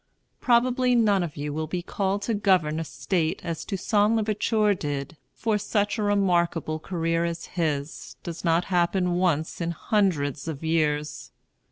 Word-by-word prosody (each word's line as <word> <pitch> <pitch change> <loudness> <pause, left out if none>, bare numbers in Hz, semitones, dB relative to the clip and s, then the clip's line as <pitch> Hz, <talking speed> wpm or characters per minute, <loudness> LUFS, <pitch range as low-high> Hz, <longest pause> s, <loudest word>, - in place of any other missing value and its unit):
Probably 250 +1 +3
none 210 -5 +3
of 170 -4 -4
you 145 0 -3
will 155 +1 -3
be 175 +2 -3
called 195 +2 -1
to 230 - -1
govern 185 -7 +2
a - - -1
state 165 0 -1
as 165 -2 -3
Toussaint 205 +2 +1
l'Ouverture 215 -1 +2
did; 145 -3 -4 0.2
for 220 -2 -1
such 205 +2 0
a - - +1
remarkable 175 -6 +1
career 165 -1 -1
as 170 -1 -3
his 155 -3 -3
does 170 0 -6
not 170 0 +2
happen 180 +1 +2
once 175 -3 0
in 170 - -1
hundreds 165 - 0
of 160 -2 -5
years. 150 -2 0
175 Hz, 155 wpm, -26 LUFS, 160-205 Hz, 0.2 s, Probably